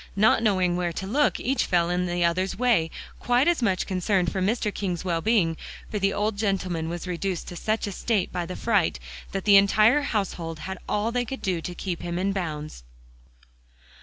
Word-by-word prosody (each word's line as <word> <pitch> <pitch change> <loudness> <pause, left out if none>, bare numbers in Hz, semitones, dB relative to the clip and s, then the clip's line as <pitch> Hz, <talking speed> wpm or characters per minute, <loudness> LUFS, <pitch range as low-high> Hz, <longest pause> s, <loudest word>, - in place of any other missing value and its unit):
Not 215 +2 +4
knowing 185 -5 +2
where 175 -1 -1
to 190 - -4
look, 285 +9 +1
each 265 +3 0
fell 175 -1 +2
in 180 0 0
the 175 0 +1
other's 185 +3 0
way, 230 -9 +2 0.3
quite 245 +4 +2
as 345 -5 +2
much 190 -6 +1
concerned 185 0 0
for 190 - -2
Mr. 210 +1 0
King's 180 -3 -3
well 170 -2 0
being; 175 -6 +2 0.3
for 210 - -1
the 195 0 +2
old 210 +1 -1
gentleman 185 -6 -1
was 175 +1 -5
reduced 180 0 -3
to 175 - -8
such 215 +6 -1
a 205 - -4
state 200 0 -1
by 175 -1 -3
the 180 - -5
fright 205 -7 +1 0.3
that 195 -1 -4
the 200 -1 +8
entire 215 +7 +5
household 190 - -2
had 190 -1 -5
all 210 +2 0
they 245 0 0
could 265 +3 -7
do 180 -4 0
to 175 +2 -6
keep 180 -2 -4
him 175 0 -3
in 190 +2 0
bounds. 155 - -5
190 Hz, 200 wpm, -25 LUFS, 175-215 Hz, 0.3 s, the